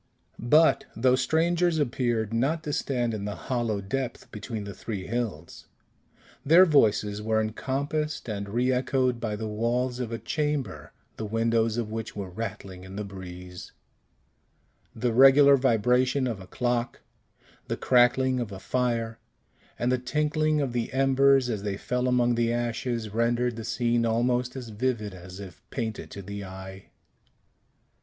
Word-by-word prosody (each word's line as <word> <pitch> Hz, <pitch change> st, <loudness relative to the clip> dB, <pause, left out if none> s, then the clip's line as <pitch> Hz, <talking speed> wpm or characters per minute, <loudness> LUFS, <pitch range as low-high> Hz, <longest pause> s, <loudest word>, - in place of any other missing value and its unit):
But 160 Hz, +3 st, +5 dB
those 130 Hz, +2 st, +3 dB
strangers 170 Hz, +4 st, +2 dB
appeared 120 Hz, -6 st, 0 dB
not 145 Hz, +8 st, 0 dB
to 150 Hz, -, -3 dB
stand 120 Hz, -5 st, -1 dB
in 105 Hz, -2 st, -4 dB
the 105 Hz, -, -4 dB
hollow 115 Hz, -5 st, -2 dB
depth 120 Hz, +5 st, -4 dB
between 105 Hz, 0 st, -5 dB
the 100 Hz, 0 st, -7 dB
three 100 Hz, -4 st, -6 dB
hills. 105 Hz, -8 st, -4 dB, 0.8 s
Their 170 Hz, +6 st, +7 dB
voices 105 Hz, -, +2 dB
were 110 Hz, 0 st, +1 dB
encompassed 140 Hz, +8 st, -2 dB
and 100 Hz, -2 st, -4 dB
reechoed 125 Hz, +2 st, +1 dB
by 110 Hz, -2 st, -2 dB
the 110 Hz, +1 st, -4 dB
walls 120 Hz, +4 st, -1 dB
of 120 Hz, -2 st, -3 dB
a 115 Hz, -, -2 dB
chamber, 150 Hz, 0 st, -3 dB, 0.3 s
the 110 Hz, -, -4 dB
windows 115 Hz, +1 st, +1 dB
of 115 Hz, -3 st, -2 dB
which 110 Hz, 0 st, -5 dB
were 100 Hz, -3 st, -5 dB
rattling 95 Hz, -3 st, -6 dB
in 95 Hz, +1 st, -10 dB
the 105 Hz, -, -3 dB
breeze; 90 Hz, -2 st, -9 dB, 1.2 s
the 120 Hz, +1 st, 0 dB
regular 135 Hz, +3 st, +7 dB
vibration 130 Hz, +1 st, +2 dB
of 115 Hz, -5 st, -3 dB
a 95 Hz, -, -11 dB
clock, 120 Hz, +2 st, -2 dB, 0.7 s
the -, -, -2 dB
crackling 130 Hz, +1 st, +3 dB
of 115 Hz, -4 st, -4 dB
a 95 Hz, -, -7 dB
fire, 115 Hz, -2 st, -1 dB, 0.6 s
and 120 Hz, +1 st, 0 dB
the 130 Hz, -, +1 dB
tinkling 150 Hz, +3 st, 0 dB
of 135 Hz, -4 st, -2 dB
the 120 Hz, -2 st, -2 dB
embers 135 Hz, 0 st, +4 dB
as 110 Hz, -4 st, -2 dB
they 100 Hz, -1 st, -3 dB
fell 125 Hz, +4 st, -1 dB
among 120 Hz, -1 st, +3 dB
the 115 Hz, 0 st, +1 dB
ashes, 120 Hz, -1 st, -2 dB
rendered 120 Hz, +2 st, +1 dB
the 115 Hz, -, -6 dB
scene 120 Hz, +1 st, 0 dB
almost 125 Hz, +2 st, 0 dB
as 125 Hz, -3 st, -7 dB
vivid 110 Hz, -2 st, -2 dB
as 90 Hz, +1 st, -10 dB
if 95 Hz, -1 st, -10 dB
painted 110 Hz, -4 st, -4 dB
to 100 Hz, -, -8 dB
the 100 Hz, +1 st, -6 dB
eye. 95 Hz, 0 st, -10 dB
120 Hz, 150 wpm, -27 LUFS, 105-130 Hz, 1.2 s, Their